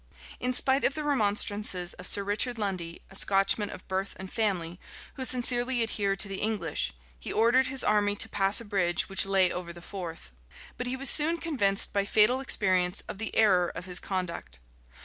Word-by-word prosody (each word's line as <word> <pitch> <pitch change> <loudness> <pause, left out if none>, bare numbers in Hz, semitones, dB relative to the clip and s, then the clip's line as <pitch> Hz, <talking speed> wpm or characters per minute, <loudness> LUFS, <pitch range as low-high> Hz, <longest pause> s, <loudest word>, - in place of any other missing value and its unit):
In 250 - -1
spite 265 +2 +1
of 275 - +1
the 305 - -4
remonstrances 205 -8 0
of 180 - -7
Sir 200 - +2
Richard 215 +5 0
Lundy, 185 -5 -4
a - - -12
Scotchman 195 +2 +2
of - - -10
birth 190 +1 -3
and 190 0 -9
family, 180 -6 -2 0.3
who 265 - -6
sincerely 245 -1 +2
adhered 200 -3 -2
to 200 - 0
the 195 -1 -5
English, 205 -8 -2 0.3
he - - -7
ordered 240 +4 +3
his 265 0 -3
army 205 -1 +1
to - - 0
pass 195 +1 +2
a 235 - -9
bridge 185 -5 0
which 195 0 +2
lay 190 -2 +3
over 180 -1 -5
the 170 - -11
Forth; 170 - -8 0.4
but 250 - -5
he 250 - -2
was 270 0 +1
soon 320 +3 +4
convinced, 250 -13 +1
by 200 - +1
fatal 215 +5 +4
experience, 185 -8 +2
of 195 - -7
the 220 - -4
error 185 -5 +3
of - - -7
his 180 -1 0
conduct. 170 - -5
200 Hz, 190 wpm, -27 LUFS, 185-240 Hz, 0.4 s, soon